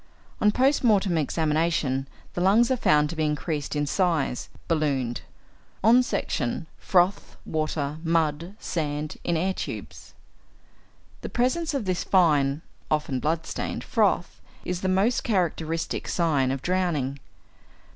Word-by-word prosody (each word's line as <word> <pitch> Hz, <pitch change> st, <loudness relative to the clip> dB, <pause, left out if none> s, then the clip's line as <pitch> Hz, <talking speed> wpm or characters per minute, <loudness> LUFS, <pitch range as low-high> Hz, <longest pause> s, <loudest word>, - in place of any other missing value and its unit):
On 210 Hz, -, +5 dB
post 265 Hz, +6 st, +2 dB
mortem 200 Hz, -6 st, +3 dB
examination, 155 Hz, -3 st, 0 dB, 0.3 s
the 175 Hz, -, -2 dB
lungs 215 Hz, +7 st, +4 dB
are -, -, +4 dB
found 150 Hz, -10 st, +3 dB
to -, -, -5 dB
be 160 Hz, -, 0 dB
increased 150 Hz, -1 st, -2 dB
in 145 Hz, 0 st, +1 dB
size 160 Hz, -5 st, 0 dB, 0.2 s
('ballooned'); 140 Hz, -7 st, 0 dB, 0.6 s
on 235 Hz, +4 st, +7 dB
section, 155 Hz, -, -2 dB
froth, 185 Hz, +2 st, +1 dB
water 155 Hz, -1 st, -2 dB
mud, 165 Hz, +2 st, 0 dB
sand, 150 Hz, -5 st, -3 dB
in 170 Hz, -1 st, 0 dB
air 190 Hz, +4 st, 0 dB
tubes. -, -, -7 dB, 1.1 s
The -, -, -5 dB
presence 290 Hz, +6 st, 0 dB
of 260 Hz, -6 st, -2 dB
this 185 Hz, -1 st, -1 dB
fine 150 Hz, -5 st, +3 dB, 0.3 s
(often 150 Hz, -4 st, 0 dB
blood 160 Hz, +4 st, -1 dB
stained) -, -, -4 dB
froth -, -, 0 dB, 0.2 s
is 180 Hz, 0 st, -3 dB
the 190 Hz, -, 0 dB
most 200 Hz, +6 st, +2 dB
characteristic 165 Hz, -5 st, -1 dB
sign 150 Hz, -7 st, +1 dB
of 135 Hz, 0 st, -3 dB
drowning. 165 Hz, -7 st, 0 dB
165 Hz, 130 wpm, -26 LUFS, 150-190 Hz, 1.1 s, on